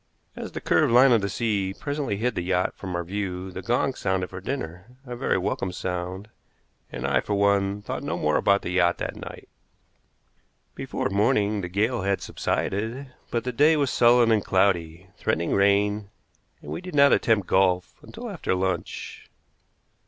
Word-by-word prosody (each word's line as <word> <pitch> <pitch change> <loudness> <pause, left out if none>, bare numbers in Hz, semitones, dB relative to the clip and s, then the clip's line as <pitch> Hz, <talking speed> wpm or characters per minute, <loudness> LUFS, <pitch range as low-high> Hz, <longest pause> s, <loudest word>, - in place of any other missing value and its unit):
As - - -7
the - - -5
curved - - +2
line 125 +2 +7
of 115 -3 +4
the 100 - -2
sea 100 -3 -1
front - - -22
presently 145 -8 -2
hid 125 +4 0
the - - -2
yacht 90 +1 0
from 95 -2 -6
our 85 - -1
view 95 0 -4
the 95 - -6
gong 120 +5 0
sounded 95 -5 -2
for 95 0 -7
dinner 115 - -6
a 125 -1 -6
very 125 - 0
welcome 95 0 -2
sound, 90 +2 -4 0.6
and 60 +2 -5
I, 70 -1 +2
for 105 - -2
one, 100 0 +1
thought - - -4
no - - -3
more 75 0 +1
about 100 0 +2
the - - -3
yacht 90 -1 +2
that - - -4
night. - - -9 1.3
Before - - -3
morning 105 0 +2
the 90 - -5
gale 110 +6 0
had 100 +1 0
subsided, 120 +7 -3 0.2
but 120 - -1
the 125 - -2
day 150 +6 +4
was 140 -4 +1
sullen 120 0 +5
and 110 -3 +3
cloudy, 90 -3 +1
threatening 85 +1 -1
rain, 100 +1 +2 0.5
and - - -8
we - - -4
did 180 -3 -8
not 140 -1 +6
attempt 110 -4 +2
golf 90 -1 +1
until 240 +2 -9
after 185 - -2
lunch. 95 -2 -4
100 Hz, 180 wpm, -25 LUFS, 95-120 Hz, 1.3 s, line